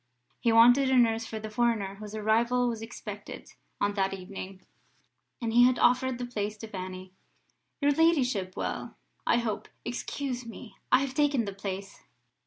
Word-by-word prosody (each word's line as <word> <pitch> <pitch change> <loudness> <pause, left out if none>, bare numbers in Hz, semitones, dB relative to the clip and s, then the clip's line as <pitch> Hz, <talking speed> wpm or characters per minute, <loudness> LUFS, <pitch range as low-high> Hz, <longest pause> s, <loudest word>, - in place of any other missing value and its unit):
He 235 - +2
wanted 245 +4 +6
a 260 - +4
nurse 225 -2 +3
for 220 - -5
the 215 0 -7
foreigner 215 -4 +1
whose 210 0 -8
arrival 235 +3 +2
was 230 -2 -3
expected 225 +1 -8 0.3
on 205 0 +1
that 195 -1 0
evening, 190 0 -8 0.8
and 230 -2 -2
he 245 +1 +7
had 250 0 +3
offered 255 0 +3
the 245 - -4
place 215 -3 -3
to 225 - -8
Fanny. 185 -2 -7 0.7
"Your 285 0 +4
ladyship 260 - +2
will, - - -4 0.3
I - - +4
hope, 230 -3 -2 0.2
excuse 250 +1 -4
me; 230 -2 -10 0.2
I 255 - +6
have 275 -2 -2
taken 280 -5 +2
the 200 - -5
place." 195 0 -6
225 Hz, 165 wpm, -29 LUFS, 200-250 Hz, 0.8 s, he